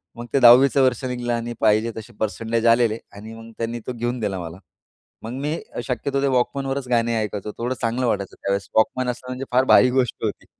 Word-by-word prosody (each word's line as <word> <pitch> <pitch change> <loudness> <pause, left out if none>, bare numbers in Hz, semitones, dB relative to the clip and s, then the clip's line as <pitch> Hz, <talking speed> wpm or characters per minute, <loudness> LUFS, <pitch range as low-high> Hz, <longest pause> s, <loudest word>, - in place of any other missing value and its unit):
मग 120 - -7
ते 140 - +4
10वीचं 130 +3 +7
वर्ष 130 0 +1
निघलं 125 -1 -2
आणि 120 0 -3
पाहिजे 110 +1 +2
तसे 110 +2 -9
परसेंटेज 115 +2 -2
आलेले 115 -1 +3 0.2
आणि 110 +2 -10
मग 115 0 -11
त्यांनी 115 +1 -3
तो 125 - -3
घेऊन 120 +1 -3
दिला 100 -4 -2
मला. 85 +1 -7 0.7
मग 115 - -6
मी 150 +3 -2 0.3
शक्यतो 135 +2 -1
ते 140 - +2
वॉकमनवरच 135 +1 -1
गाणे 115 -1 +1
ऐकायचो 105 0 -4
.थोडं 120 +2 -2
चांगलं 120 +3 0
वाटायचं 100 -4 -2
त्यावेळेस. 100 0 -3
वॉकमन 125 +3 +2
असला 125 +1 -6
म्हणजे 130 +1 -5
फार 125 +1 +4
भारी 125 - +7
गोष्ट 130 -2 +1
होती. - - -4
120 Hz, 200 wpm, -22 LUFS, 110-125 Hz, 0.7 s, 10वीचं